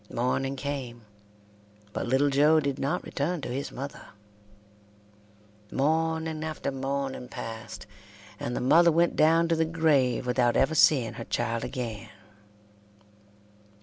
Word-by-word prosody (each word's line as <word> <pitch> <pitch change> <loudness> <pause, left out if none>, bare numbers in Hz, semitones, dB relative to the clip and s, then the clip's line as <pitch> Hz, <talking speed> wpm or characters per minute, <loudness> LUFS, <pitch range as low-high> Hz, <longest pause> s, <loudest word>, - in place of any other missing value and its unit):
Morning 130 +3 -1
came, 130 -5 -5 0.9
but - - -3
little 135 +3 +2
Joe 150 +3 +5
did 140 -2 -2
not 140 - -1
return 165 +5 -2
to - - -5
his 135 +3 -4
mother. 140 +2 -8 1.6
Morning 160 +2 0
after 155 -2 -3
morning 135 -1 -3
passed, 110 -2 -8 0.5
and 120 - -3
the - - -2
mother 165 +7 +5
went 170 +2 +2
down 165 +2 +4
to 165 - +3
the 160 - +2
grave 150 -7 +1
without 125 -1 +2
ever 135 +4 +2
seeing 135 -6 +4
her 115 - -7
child 115 -1 -2
again. 115 -3 -5
140 Hz, 125 wpm, -27 LUFS, 125-160 Hz, 1.6 s, Joe